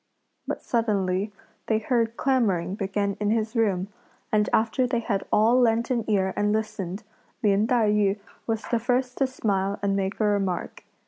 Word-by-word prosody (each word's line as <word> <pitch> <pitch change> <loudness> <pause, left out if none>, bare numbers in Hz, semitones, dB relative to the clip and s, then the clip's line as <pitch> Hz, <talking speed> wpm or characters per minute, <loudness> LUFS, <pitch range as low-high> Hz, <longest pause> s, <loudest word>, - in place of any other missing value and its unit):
But - - -4
suddenly 205 -4 0 0.4
they 220 - +2
heard 230 0 0
clamouring 200 -10 +1
begin 200 0 -1
in 210 0 0
his 220 +1 0
room, 200 -4 +1 0.4
and 210 -1 +2
after 230 +3 +2
they 240 -1 0
had 205 -4 -1
all 230 +4 +4
lent 230 0 +2
an 235 -3 -1
ear 190 -2 +1
and 205 0 +1
listened, 215 -2 -3 0.4
Lin 205 +1 +3
Tai 230 -4 +3
yü 205 -1 +2 0.3
was 225 -1 -1
the 235 - +2
first 250 +2 -1
to 270 - +3
smile 200 -6 -1
and 200 -1 +1
make 195 +1 -2
a - - +2
remark. 200 -4 -1
215 Hz, 170 wpm, -25 LUFS, 200-230 Hz, 0.4 s, all